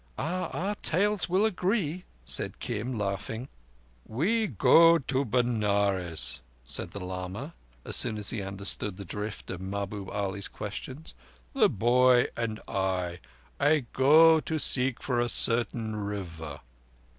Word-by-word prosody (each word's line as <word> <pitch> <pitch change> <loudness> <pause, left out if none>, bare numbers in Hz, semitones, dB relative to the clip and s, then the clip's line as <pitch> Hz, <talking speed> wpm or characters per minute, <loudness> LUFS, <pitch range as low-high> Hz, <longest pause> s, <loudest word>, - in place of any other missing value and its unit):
"Oh, 180 +5 -2
our 195 +4 -2
tales 205 +4 +2
will 190 +4 +3
agree," 185 -4 -1 0.2
said - - +2
Kim, 120 +2 -4
laughing. 105 +5 -4 0.5
"We 210 - 0
go 165 - +6
to 135 -2 -1
Benares," 100 -7 0 0.2
said - - -4
the - - -7
lama, 95 - -6 0.3
as - - -1
soon 110 -3 0
as 105 -1 +2
he 110 - -3
understood 100 0 -1
the 100 - -8
drift 105 +3 -6
of 95 -1 -6
Mahbub 100 0 -5
Ali's 100 -1 -2
questions. 130 +8 -7 0.4
"The - - +4
boy 125 +3 +3
and 115 -2 -3
I, 95 -3 -2 0.4
I 145 -1 +3
go 160 +4 +6
to 160 +1 -3
seek 130 -3 +1
for 125 -3 0
a 120 0 +1
certain 115 -2 +1
River." 85 -8 -6
115 Hz, 135 wpm, -28 LUFS, 100-145 Hz, 0.5 s, go